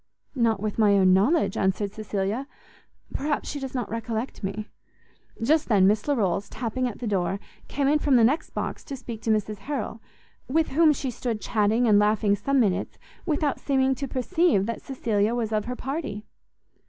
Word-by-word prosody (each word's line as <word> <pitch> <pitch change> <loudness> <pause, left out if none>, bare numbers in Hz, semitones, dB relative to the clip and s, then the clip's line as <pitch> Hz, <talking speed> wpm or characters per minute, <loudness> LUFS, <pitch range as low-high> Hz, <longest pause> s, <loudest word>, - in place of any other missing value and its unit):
"Not 230 -6 +1
with 215 +2 -3
my 210 -2 +5
own 185 -1 +5
knowledge," 210 - +3
answered 195 +1 0
Cecilia; 210 +4 -3 0.7
"perhaps 290 +1 -2
she 290 - -4
does 270 -1 -6
not 245 -4 -2
recollect 230 +1 -4
me." 200 +2 -4 0.8
Just 310 +4 +2
then 200 -4 +5
Miss 210 +6 +2
Larolles, 205 -9 0
tapping 250 +1 -2
at 230 - -6
the 245 - -6
door, 195 -2 0 0.3
came 280 0 -1
in 300 +2 +3
from 285 -3 +3
the 235 - +6
next 275 +8 +2
box - - -4
to 275 - -5
speak 235 -4 -8
to 225 - -3
Mrs 215 -1 0
Harrel; 230 -2 -4 0.5
with 315 +4 +1
whom 315 +2 +5
she 270 -3 -2
stood 235 -2 -3
chatting 220 +3 +1
and 205 -2 +6
laughing 210 -1 +3
some 275 +7 +1
minutes, 200 -7 0 0.3
without 300 -3 0
seeming 265 -1 +2
to 275 +2 -4
perceive 265 - +1
that 230 +1 -4
Cecilia 225 -4 0
was 225 -2 -2
of 215 -1 0
her 250 +1 -4
party. 260 -6 -4
230 Hz, 180 wpm, -25 LUFS, 210-270 Hz, 0.8 s, the